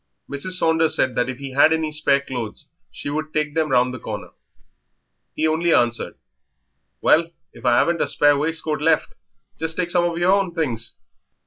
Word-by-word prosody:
Mrs. 140 +7 -2
Saunders 160 -2 +3
said 130 - +1
that 125 +1 0
if 130 - -5
he 140 -1 -7
had 145 +4 +5
any 160 -1 0
spare 140 -2 +2
clothes 125 -6 -5 0.2
she 145 - -6
would 155 +1 -3
take 150 -1 -1
them 160 -1 0
round 125 -1 +2
the 130 - -7
corner. - - -7 1.0
He 155 - +1
only 165 +2 +1
answered 120 0 +1 0.9
"Well, 165 +1 +4 0.2
if - - -13
I 120 -1 +4
'aven't 170 -1 +1
a - - +1
spare 145 0 +4
waistcoat 155 0 -2
left 160 0 +1 0.5
just 160 0 -3
take 175 -1 0
some 175 -1 +3
of 170 -1 -2
yer 175 +2 +3
own 195 -3 +1
things. 115 -8 -3
155 Hz, 185 wpm, -21 LUFS, 135-165 Hz, 1.0 s, had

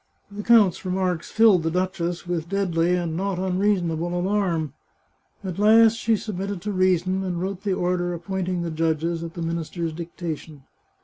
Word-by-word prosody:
The 205 +1 -6
count's 210 -5 +4
remarks 185 -2 -1
filled 220 -5 +5
the 160 - 0
duchess 175 0 -2
with 170 -2 -3
deadly 180 -3 +1
and 170 -3 -2
not 195 +1 -1
unreasonable 180 -3 0
alarm. 175 -6 0 0.7
At 185 -1 -5
last 220 +1 +6
she 230 0 +1
submitted 200 -2 -4
to 210 - -2
reason, 185 0 +1
and 180 -2 -2
wrote 190 +1 -3
the 200 -2 -1
order 175 -1 0
appointing 180 0 -3
the 170 - -3
judges, 165 +1 -1
at 165 -1 -7
the 170 - -4
minister's 165 0 -3
dictation. 160 -3 -6
180 Hz, 160 wpm, -24 LUFS, 170-195 Hz, 0.7 s, last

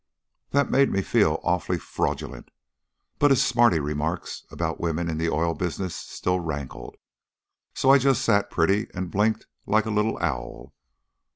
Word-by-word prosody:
"That 140 -1 +1
made 140 +1 +4
me 95 - 0
feel 85 -10 +2
awfully 90 0 0
fraudulent, - - -4 0.7
but 145 - +5
his 135 - +4
smarty 120 -8 +4
remarks 75 +4 -3
about - - -3
women 85 0 -1
in 80 -1 -3
the 85 0 0
oil 85 +2 0
business 90 0 -3
still 90 0 -2
rankled, 70 -7 -6 0.8
so 135 - +4
I 140 - +7
just 135 -2 +2
sat 100 -3 +2
pretty 100 +3 +1
and 90 -1 -4
blinked 110 +2 +1 0.2
like 110 +1 +2
a 110 - -2
little 105 +1 0
owl. 70 -8 -4
90 Hz, 155 wpm, -25 LUFS, 80-110 Hz, 0.8 s, I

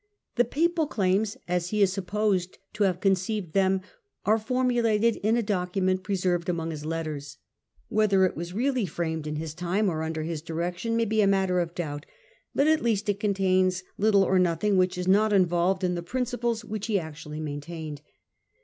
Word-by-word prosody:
The 245 - +3
papal 325 +5 +1
claims, 200 -2 0
as 180 0 -1
he 210 -1 +2
is 190 -1 +2
sup 195 -2 -5
posed 200 -3 0 0.2
to 210 -1 +2
have 180 -2 0
conceived 190 -2 0
them, 190 -1 +2 0.4
are 215 +2 +3
formulated 235 -2 +1
in 220 +3 +1
a 235 - +1
document 185 -2 0
preserved 185 -3 -1
amongst 165 -2 -2
his 150 -1 -6
letters. 155 -4 -4 0.5
Whether 200 -3 +3
it 185 - -1
was 170 +2 -5
really 245 +1 0
framed 160 -2 -3
in 150 - -3
his 155 0 -4
time 180 +5 0
or 160 -1 -3
under 160 0 -3
his 160 -1 -4
direction 175 +8 -2
may 230 - +2
be 220 0 +2
a 200 - +4
matter 190 -2 +2
of 170 -1 -2
doubt, 145 -3 -4 0.5
but, 280 - +3
at 315 0 +3
least, 215 -3 0
it 200 0 0
contains 185 -3 +1 0.2
little 200 -1 +4
or 190 -1 +3
nothing 180 +3 +2
which 185 0 +2
is 180 0 -3
not 210 +3 +4
involved 185 0 +2
in 180 -1 +1
the 175 - -3
principles 240 +2 -2
which 215 -1 -4
he 210 -3 +2
actually 155 -2 -7
maintained. 150 0 -6
185 Hz, 185 wpm, -27 LUFS, 170-215 Hz, 0.5 s, a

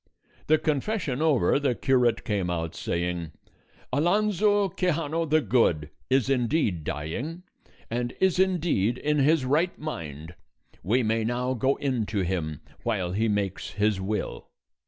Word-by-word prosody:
The 155 - +5
confession 150 - -1
over, 140 - +3
the 135 -4 +1
curate 120 -3 +2
came 100 -5 -1
out 80 -2 -2
saying: 85 -2 -3 0.6
"Alonso 205 +5 +3
Quixano 165 -3 -1
the 155 +1 +4
Good 85 - +2 0.2
is 130 -2 +3
indeed 125 - +1
dying, 120 - -4 0.4
and 120 +1 -3
is 190 -1 +2
indeed 165 - +2
in 150 +2 0
his 145 0 +3
right 155 +7 +1
mind; 80 - -6 0.5
we 120 +6 +1
may 110 0 +1
now 125 +3 -1
go 130 +2 +1
in 130 -6 -1
to 105 -2 -1
him, 85 -5 -2 0.2
while 100 -7 -1
he 110 +5 +1
makes 100 -3 -2
his 105 -1 +1
will." 105 +2 -3
125 Hz, 135 wpm, -26 LUFS, 95-155 Hz, 0.6 s, The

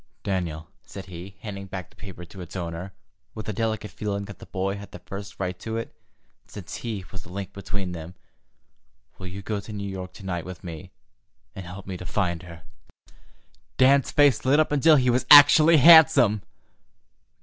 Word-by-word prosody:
"Daniel," 85 -5 -3
said 95 -1 -10
he, 95 +2 -10
handing 100 -2 -7
back 95 -1 -7
the - - -24
paper 95 -3 -10
to 95 +2 -12
its 90 +1 -10
owner, 85 +1 -5 0.4
with 110 - -7
a 110 - -2
delicate 110 0 -3
feeling 100 -1 -4
that 100 -1 -11
the - - -12
boy 95 +1 -2
had 100 0 -10
the - - -10
first 100 +3 -9
right 90 -1 -3
to 110 0 -4
it, 115 - -6 0.5
since 105 -1 -8
he 105 -6 -5
was 95 - -8
the - - -15
link 100 0 -6
between 100 -2 -5
them, 85 +1 -8 1.0
"will 95 - -7
you 95 +2 -8
go 105 0 -3
to 100 - -10
New 100 -1 -5
York 95 -1 -6
to 100 - -12
night 90 -3 -3
with 90 -2 -10
me 80 -3 -8 0.7
and 95 -2 -8
help 95 +3 -9
me 95 -1 -6
to 90 - -9
find 85 -2 -1
her?" 85 -3 -12 1.1
Dan's 135 +1 +4
face 145 -3 +3
lit 135 +4 +3
up 155 - +2
until 150 +2 +5
he 125 -3 +3
was 125 +2 0
actually 150 +2 +9
handsome. 145 -9 +7
100 Hz, 190 wpm, -25 LUFS, 90-110 Hz, 1.1 s, actually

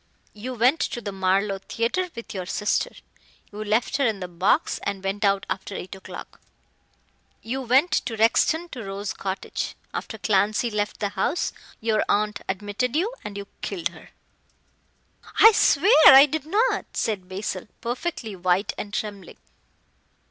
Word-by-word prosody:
You 250 +5 -6
went 250 +7 +3
to - - -2
the 205 -3 -5
Marlow 195 +1 +1
Theatre 235 - -1
with 230 - -8
your 185 -3 -5
sister. 210 +2 0 0.6
You 210 +1 -6
left 215 +5 +1
her 280 - +2
in 215 -3 -1
the 180 - -5
box 180 - +1
and 195 -1 -4
went 195 +2 -2
out 195 -1 +2
after 195 +1 -4
eight 185 - -6
o'clock. 190 0 -10 1.0
You 255 +4 -3
went 260 +7 +3
to 225 -2 -1
Rexton 315 +10 +3
to 245 -4 -6
Rose 200 +2 -4
Cottage. 190 0 -4 0.2
After 220 - -5
Clancy 210 +4 +1
left 210 0 -2
the 205 - 0
house 325 - -1 0.3
your 220 -1 +1
aunt 210 0 +1
admitted 205 +6 -2
you 390 +10 +1
and 200 -1 -6
you 200 - -5 0.2
killed 175 -4 -2
her 170 -2 -15 0.7
" - - -16
"I 445 - +10
swear 390 - +4 0.2
I 275 +1 +10
did 300 0 -4
not!" 440 +9 +1
said 190 -4 -2
Basil, 190 0 -4
perfectly 240 - -4
white 180 +2 +1
and 205 0 -5
trembling. 205 -3 -5
210 Hz, 155 wpm, -24 LUFS, 195-250 Hz, 1.0 s, I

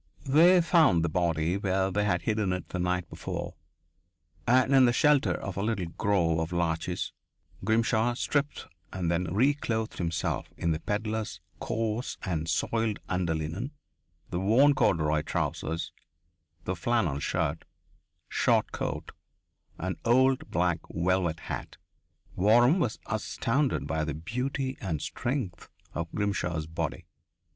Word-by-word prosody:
They 170 +6 +6
found 160 - +4
the - - 0
body 85 +1 +1
where 95 -1 0
they 105 +2 +1
had 90 -4 +1
hidden 105 -4 0
it 90 -2 -5
the 90 - -4
night 90 -1 0
before, - - -5 0.9
and 130 +3 +4
in 135 -1 +7
the 120 - +3
shelter 150 +1 +4
of 95 -1 -6
a - - 0
little 100 -5 -1
grove 85 -5 +1
of 80 +1 -2
larches 85 0 -1 0.5
Grimshaw 115 +1 +2
stripped 145 +3 -1 0.3
and 90 -3 -1
then 85 +2 0
reclothed 115 0 0
himself 85 -2 -2
in 85 - 0
the 80 - -1
pedlar's 105 -1 -3 0.2
coarse 115 +2 -2
and 85 -3 -2
soiled 115 +1 0
under 90 -3 0
linen, 85 - -4 0.6
the 90 - -1
worn 120 +9 +5
corduroy 75 - +2
trousers, 80 +1 -2 0.7
the 95 +2 -2
flannel 90 - 0
shirt, 80 +1 -1 0.6
short - - +2
coat, - - -4 0.7
and 95 0 -3
old 130 +3 +3
black 85 0 +1
velvet 85 -2 0
hat. - - -6 0.6
Waram 120 - +5
was 120 -10 0
astounded 115 +5 0
by 80 -1 -1
the 75 -1 -3
beauty 130 - -3
and 85 -7 -2
strength 120 - -3 0.2
of 85 0 -4
Grimshaw's 90 -6 -1
body. 80 0 -4
95 Hz, 135 wpm, -28 LUFS, 85-120 Hz, 0.9 s, in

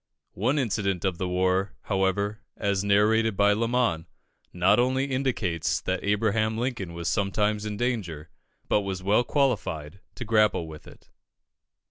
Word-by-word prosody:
One 125 +10 0
incident 100 - -1
of 90 -3 -1
the 95 - -1
war, 95 +2 0
however, 100 +2 0 0.2
as 100 -2 0
narrated 105 +1 +3
by 100 0 +4
Lamon, 115 -6 0 0.4
not 90 +5 +3
only 130 +2 +2
indicates 125 - -1
that 95 0 -3
Abraham 110 +2 +1
Lincoln 120 -8 -3
was 85 -1 -4
sometimes 105 +1 0
in 105 -1 -4
danger, 90 -11 -3 0.4
but 105 - +2
was 95 -2 -4
well 105 +5 +3
qualified 95 - -1 0.2
to 125 - -6
grapple 105 -6 +2
with 75 -1 -11
it. - - -17
100 Hz, 140 wpm, -26 LUFS, 95-115 Hz, 0.4 s, by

